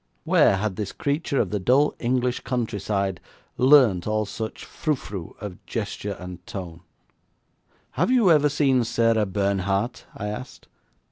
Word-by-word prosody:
Where 100 - +4
had 100 -1 -2
this 105 -2 -3
creature 145 0 -1
of 100 - 0
the 105 - -1
dull 130 +9 +3
English 125 0 0
countryside 100 -6 -2 0.3
learnt 125 -10 +5
all 110 0 0
such 110 +2 -6
frou 155 -2 -1
frou 100 -9 -8
of 100 -4 -8
gesture 105 -2 -4
and 90 -1 -9
tone? 85 -4 -7 1.1
'Have - - 0
you 240 -8 +5
ever 150 -2 +5
seen 135 -4 +2
Sarah 115 -2 +2
Bernhardt?' 100 +4 -1
I 105 - -5
asked. 105 +5 -8
110 Hz, 140 wpm, -24 LUFS, 100-130 Hz, 1.1 s, learnt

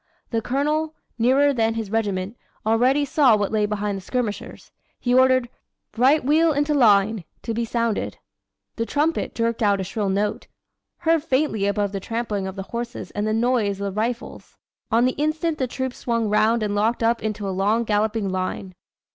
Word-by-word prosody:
The 225 -2 0
Colonel, 300 +6 -1 0.2
nearer 270 +5 +4
than 225 -2 +1
his 220 -3 -4
regiment, 205 -2 -1 0.3
already 250 +6 +3
saw 265 -5 +4
what 205 -1 -1
lay 210 -1 +1
behind 205 -1 -2
the - - -7
skirmishers. 225 +1 -4 0.3
He 245 - 0
ordered 255 -1 +4 0.5
'Right 260 +5 +3
wheel 315 +3 +4
into 290 +1 +1
line' 215 -6 +4 0.2
to 230 - -3
be 230 +1 -1
sounded. 230 -1 -1 0.6
The 230 0 -2
trumpet 305 +3 0
jerked 230 0 -1
out 200 -2 +3
a - - -1
shrill 195 +2 -2
note, 205 +2 -1 0.5
heard 325 -2 +2
faintly 260 -9 0
above 200 0 0
the 200 - -3
trampling 210 -2 -3
of 190 - -6
the 195 - -5
horses 235 +4 -6
and 205 +1 -2
the 215 - 0
noise 225 -4 +1
of 200 -1 -3
the 210 - -3
rifles. 235 +2 -5 0.3
On 235 +2 +3
the 255 - +3
instant 310 +1 0
the 260 - 0
troops 260 +1 -4
swung 230 -3 -1
round 220 +2 +3
and 205 -1 -1
locked 220 +3 +1
up 230 +1 +2
into 210 -2 -3
a - - -1
long, 205 +5 +1
galloping 215 -1 0
line. 185 0 -3
225 Hz, 180 wpm, -23 LUFS, 205-255 Hz, 0.6 s, nearer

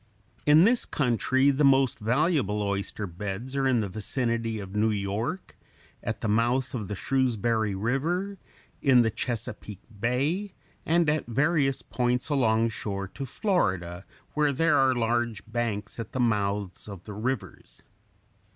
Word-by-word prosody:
In 150 +3 +7
this 235 +4 +4
country 130 +1 +2
the 140 +2 +1
most 135 -2 +4
valuable 120 - +1
oyster 100 +1 -2
beds 100 +8 -5
are 135 -1 +2
in 125 -3 +3
the 105 - -2
vicinity 115 +2 -2
of 100 -1 -7
New 110 +1 +3
York, 105 - -3 0.5
at - - -4
the - - -1
mouth 120 +5 +1
of 110 -6 -3
the 105 - -4
Shrewsbury 115 -4 0
River, 165 - -1 0.4
in 130 -4 +5
the 110 - +1
Chesapeake 105 -3 -5 0.2
Bay, 145 - 0 0.3
and 170 0 +3
at 150 -3 0
various 135 +2 +1
points 125 +2 -1
alongshore 110 -6 0
to 135 - -6
Florida, 95 - -1 0.3
where 150 -1 +2
there 165 +4 +3
are 130 -1 +4
large 120 -2 0
banks 110 -2 -3
at 115 - -6
the 130 - -2
mouths 100 -5 0
of 100 -4 -9
the 105 - -8
rivers. 125 +5 -5
120 Hz, 140 wpm, -27 LUFS, 105-135 Hz, 0.5 s, In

